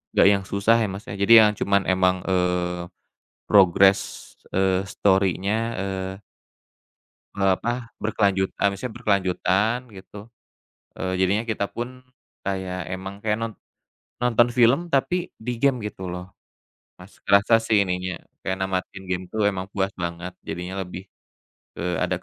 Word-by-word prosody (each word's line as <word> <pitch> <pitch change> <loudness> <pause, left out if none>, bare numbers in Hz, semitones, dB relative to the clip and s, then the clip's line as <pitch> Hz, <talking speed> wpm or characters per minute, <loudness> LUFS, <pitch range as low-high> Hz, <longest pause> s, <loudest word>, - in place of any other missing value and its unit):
nggak - - +6
yang 100 -1 +1
susah 100 +4 +3
ya 110 - +1
maksudnya, 100 0 -7
jadi 115 - +6
yang 105 - +2
cuman 100 0 +2
emang, 95 0 +3
eee, 90 -1 0 0.6
progress, 95 0 +4 0.2
eee, 95 0 +2
story-nya, 100 +1 +1 0.2
eee 95 0 -4 1.1
E 100 - -6
apa, 115 +5 0
berkelanjut 100 -3 0 0.2
misalnya 105 +5 -5
berkelanjutan 105 +2 0
gitu. 105 +2 -12 0.7
Eee, 95 0 -2
jadinya 100 +5 +1
kita 105 -3 -2
pun 125 +2 -6 0.4
kayak 95 -2 -4
emang 95 +2 -6
kayak 105 0 0
non 115 -1 -4 0.7
nonton 120 -1 +3
film, 125 +8 +3
tapi 175 +6 0
di 120 +2 -4
game 135 -2 +3
gitu 95 -3 -6
loh. 90 +1 -8 0.6
Masih 90 +3 -16
kerasa 105 +3 +4
sih 110 -3 +2
ininya, 90 -1 -3 0.2
kayak 95 0 -2
namatin 95 0 -3
game 95 0 -2
tuh 110 -1 0
emang 95 -1 -1
puas 95 0 -2
banget. 85 0 -5
Jadinya 90 +3 -5
lebih 90 +1 -7 0.7
ke 90 0 -2
ada - - -1
95 Hz, 135 wpm, -24 LUFS, 95-110 Hz, 1.1 s, nggak